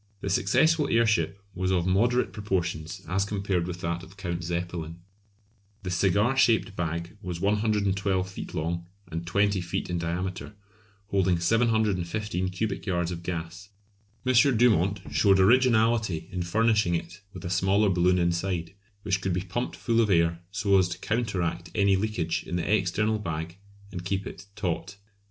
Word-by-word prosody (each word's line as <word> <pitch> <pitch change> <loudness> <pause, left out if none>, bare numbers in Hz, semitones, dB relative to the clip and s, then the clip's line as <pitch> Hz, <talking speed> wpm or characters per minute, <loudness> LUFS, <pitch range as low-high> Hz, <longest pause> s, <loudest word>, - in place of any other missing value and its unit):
The 100 - -2
successful 150 - +3
airship 110 -6 +2 0.2
was 95 0 -1
of 90 -2 +1
moderate 120 +7 +2
proportions 90 -6 -3
as 95 +4 +1
compared 100 -4 -1
with 90 0 -6
that 85 +1 -2
of 95 +1 -14
Count 85 -4 -4
Zeppelin. 85 -1 -4 0.8
The 90 - -3
cigar 100 +7 +2
shaped 115 -5 +3
bag 85 +2 -3
was 90 -4 -5
112 100 -2 +1
feet 95 - -8
long 85 +2 -2 0.2
and 85 +1 -4
20 100 +1 +2
feet 85 0 -3
in 90 - -1
diameter, 90 +4 -4 0.5
holding 95 -3 +2
715 105 -2 +1
cubic 95 +3 -3
yards 85 -2 0
of 85 -1 -5
gas. 85 +3 -5 0.6
M. 130 - +2 0.2
Dumont 100 -5 +3
showed 95 +6 +4
originality 110 -5 +3
in 90 -2 -3
furnishing 105 0 +2
it 85 +3 -6
with 95 -1 -9
a 90 - -3
smaller 95 +3 +3
balloon 90 0 +3
inside, 85 0 -1 0.3
which 100 -2 0
could 95 -2 -1
be 90 - 0
pumped 100 +7 -3
full 115 -1 +1
of 110 - +1
air 85 -2 +2
so 100 -1 +2
as 90 -1 +2
to 85 - -5
counteract 95 -5 -2
any 100 -2 +4
leakage 95 -5 -1
in 85 - -5
the 90 - -2
external 105 +3 +1
bag 85 -2 -5 0.3
and 90 -2 -6
keep 95 +2 -2
it 100 - -9
taut. 100 0 -3
95 Hz, 155 wpm, -27 LUFS, 85-105 Hz, 0.8 s, showed